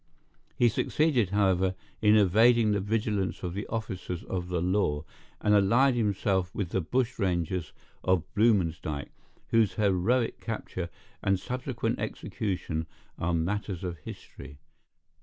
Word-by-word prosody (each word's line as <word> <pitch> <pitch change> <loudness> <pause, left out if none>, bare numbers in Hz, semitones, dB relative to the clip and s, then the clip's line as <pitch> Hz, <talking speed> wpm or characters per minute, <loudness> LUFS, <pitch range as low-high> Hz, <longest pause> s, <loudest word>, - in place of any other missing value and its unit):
He 120 - +4
succeeded, 125 - +2
however, 95 -2 +2 0.3
in 105 0 +6
evading 110 +3 +5
the 105 - +2
vigilance 105 -1 -1
of 90 -1 -3
the 100 +2 -4
officers 95 -6 -4
of 90 -2 -4
the 90 -1 -1
law, 90 -4 +1 0.4
and 105 - +3
allied 115 +7 +5
himself 100 -5 +1
with 100 -5 -2
the 95 - 0
bushrangers 95 -6 -1 0.3
of 95 -3 +2
Bluemansdyke, 85 -9 +1 0.4
whose 115 -3 +3
heroic 105 +4 +1
capture 95 -6 -4 0.3
and 95 -1 +2
subsequent 120 +1 -3
execution 95 -7 -3 0.3
are 85 +1 0
matters 95 +2 -2
of 85 -3 -4
history. 70 -1 -10
100 Hz, 120 wpm, -28 LUFS, 90-110 Hz, 0.4 s, in